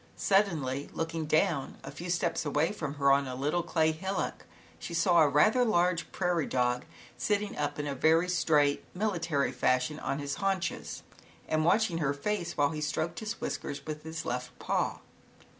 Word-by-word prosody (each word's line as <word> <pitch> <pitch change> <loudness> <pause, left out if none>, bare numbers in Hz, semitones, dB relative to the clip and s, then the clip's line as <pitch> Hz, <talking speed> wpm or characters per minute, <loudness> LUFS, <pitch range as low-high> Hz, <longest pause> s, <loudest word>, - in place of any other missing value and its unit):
Suddenly, 155 -9 +1
looking 165 -1 -3
down, 155 -2 +1
a 135 - -7
few 170 +5 -7
steps 170 -1 0
away 150 +3 +1
from 155 -8 -4
her, 140 -1 +3
on 140 0 +3
a 130 - -4
little 150 +6 0
clay 160 -2 +2
hillock, 190 +5 -3 0.3
she 170 - -6
saw 170 0 +4
a 150 - +5
rather 215 - +4
large 180 -6 +1
prairie 175 -4 0
dog, 125 -1 0 0.3
sitting 205 +9 0
up 145 0 -2
in 145 - -3
a 145 - -2
very 160 +6 +3
straight, 150 -5 +2
military 170 -9 0
fashion 130 +3 +1
on 140 - -2
his 145 -1 -3
haunches 195 -2 -2 0.4
and 155 0 +1
watching 180 -1 +3
her 140 -3 0
face, 175 +3 -2
while 145 -1 +3
he 155 -1 -4
stroked 160 +3 -2
his 220 +1 -5
whiskers 140 - -4
with 155 -1 -5
his 160 0 -6
left 125 +1 -4
paw. - - -1
160 Hz, 175 wpm, -30 LUFS, 145-175 Hz, 0.4 s, a